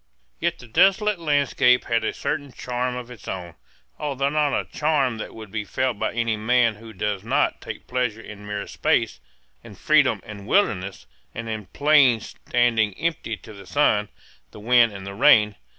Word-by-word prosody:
Yet - - -1
the 125 - -13
desolate 195 - +3
landscape 145 -5 +2
had 115 -1 0
a - - 0
certain 145 -2 -4
charm 125 0 -3
of 125 0 -7
its 120 - -12
own, 90 -3 -5 0.5
although 140 -1 -1
not 150 -2 +1
a - - -5
charm 140 -7 0
that - - -7
would 110 -3 -10
be 110 0 -3
felt 130 0 -2
by - - -1
any 115 -1 0
man 115 +2 +2
who 115 +1 -12
does 105 -1 -3
not 115 - 0
take - - -8
pleasure 125 -3 -2
in 105 -2 -11
mere 105 -1 -4
space, - - 0 0.4
and - - -13
freedom - - +3
and 100 -1 -10
wildness, 100 - 0 0.3
and 115 0 -5
in 110 -3 -5
plains 140 -5 +3
standing 115 -4 +2
empty 155 -8 -3
to 110 - -13
the 100 -2 -13
sun, 105 -8 +2 0.4
the - - -13
wind, 120 +1 +4
and 100 -1 -9
the 100 - -6
rain. 105 +1 +5
115 Hz, 180 wpm, -23 LUFS, 105-130 Hz, 0.5 s, rain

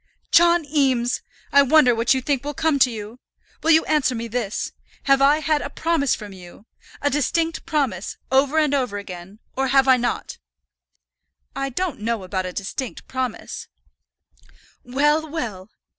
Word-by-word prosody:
"John 340 -1 +5
Eames, 265 -5 +1 0.3
I 280 - +7
wonder 280 -2 +5
what 230 +3 +2
you 260 - -1
think 280 -2 0
will 295 0 -5
come 315 -2 +1
to 260 - +5
you! 220 +1 -8 0.4
Will 325 - 0
you 320 0 +5
answer 295 -5 +1
me 230 0 -4
this; 225 -3 -3 0.3
have 275 -1 +3
I 290 +3 +4
had 310 -1 +1
a - - -5
promise 315 -3 0
from 205 -2 -9
you, 180 +2 -14 0.4
a 285 - +2
distinct 325 +4 -1
promise, 270 - -1
over 275 +3 +3
and 305 -2 +3
over 250 -7 0
again, 190 0 -9 0.2
or 270 0 0
have 270 +1 +4
I 260 -1 +6
not?" 240 0 -3 1.2
"I 275 0 -2
don't 330 +2 -3
know 225 -1 -2
about 185 0 -3
a - - -5
distinct 215 +7 -5
promise 255 -3 -4 0.6
" - - -30
"Well, 300 +2 +2
well! 220 - -5
265 Hz, 165 wpm, -22 LUFS, 230-295 Hz, 1.2 s, I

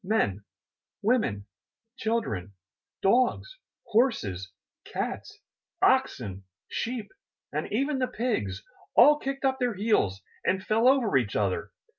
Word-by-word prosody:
Men, 180 - 0 0.6
women, 210 - +1 0.5
children, 110 - -2 0.5
dogs, 255 - +2 0.3
horses, 105 - +1 0.3
cats, - - -5 0.4
oxen, 95 -1 +1 0.2
sheep 235 -2 -4 0.4
and - - -3
even 275 +5 0
the 255 - +1
pigs 105 - -2 0.3
all 295 +1 +7
kicked 275 0 -3
up 265 0 +1
their 245 -4 0
heels 185 - +1 0.2
and 190 +1 0
fell 225 +3 +3
over 255 - +4
each 120 -6 -1
other! 100 -3 0
220 Hz, 110 wpm, -28 LUFS, -, 0.6 s, all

